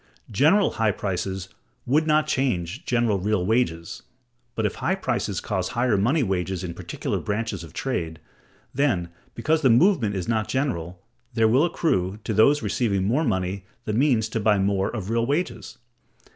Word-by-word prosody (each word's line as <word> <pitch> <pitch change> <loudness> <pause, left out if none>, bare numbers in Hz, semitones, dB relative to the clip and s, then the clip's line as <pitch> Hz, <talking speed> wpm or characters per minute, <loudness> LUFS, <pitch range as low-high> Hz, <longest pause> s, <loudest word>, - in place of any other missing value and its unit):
General 160 - +4
high 110 -1 +1
prices 95 -1 -3 0.4
would 155 +5 +2
not 155 0 +3
change 125 - -1
general 115 -5 +1
real 100 -1 0
wages. 90 -7 -1 0.5
But 110 - -1
if 105 - 0
high 190 - +1
prices 120 - -2
cause 95 -3 -2
higher 120 -2 +1
money 125 +10 +2
wages 95 -2 -2
in 85 -2 -4
particular - - -4
branches 105 -3 -3
of 80 - -11
trade, 80 - -3 0.5
then, 120 -12 +1 0.3
because 155 +7 +1
the 135 - +4
movement 120 - +4
is 90 -2 -3
not 110 -3 0
general, 90 - -2 0.3
there 115 -1 +4
will 130 +8 +4
accrue, 100 - 0
to 110 - -2
those 140 +8 +4
receiving 100 -6 0
more 125 +11 +1
money, 95 - -1 0.2
the 105 - -2
means 120 -3 +2
to 110 - -2
buy 105 -1 +3
more 95 0 +1
of 110 -3 -5
real 115 0 +1
wages. 155 +6 -2
110 Hz, 165 wpm, -24 LUFS, 95-130 Hz, 0.5 s, General